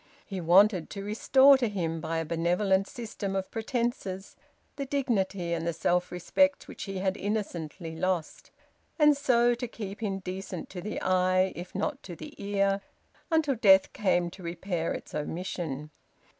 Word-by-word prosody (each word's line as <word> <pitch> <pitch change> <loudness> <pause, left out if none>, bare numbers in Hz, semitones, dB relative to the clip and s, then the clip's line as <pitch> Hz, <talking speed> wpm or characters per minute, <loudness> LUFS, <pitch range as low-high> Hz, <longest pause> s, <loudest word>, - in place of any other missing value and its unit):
He 190 -3 -5
wanted 180 +1 +5
to 200 - -6
restore 265 +6 +5
to 240 -3 +1
him, 165 -5 -2
by 165 0 -2
a 165 - -1
benevolent 180 +4 +1
system 215 -4 -5
of 190 -1 -3
pretences, 225 -5 -3 0.4
the 275 -1 -4
dignity 200 -10 0
and 165 0 -2
the 170 - 0
self 175 +2 0
respect 280 - +1
which - - -7
he 195 -1 -5
had 190 0 0
innocently 175 -6 -4
lost, 175 -1 -2 0.5
and 300 -2 +6
so 245 -4 +3
to 245 +1 -4
keep 210 -2 -7
him 200 -3 -1
decent 185 -1 -6
to 180 - -6
the 210 +4 -4
eye, 185 0 +2
if 180 +2 -8
not 270 +8 -2
to 175 - -8
the 155 - -9
ear, 200 0 +1 0.5
until 320 -4 +2
death 195 -5 +5
came 180 -4 +1
to 190 - -12
repair 170 0 -3
its - - -6
omission. 155 -2 -4
190 Hz, 160 wpm, -28 LUFS, 175-220 Hz, 0.5 s, and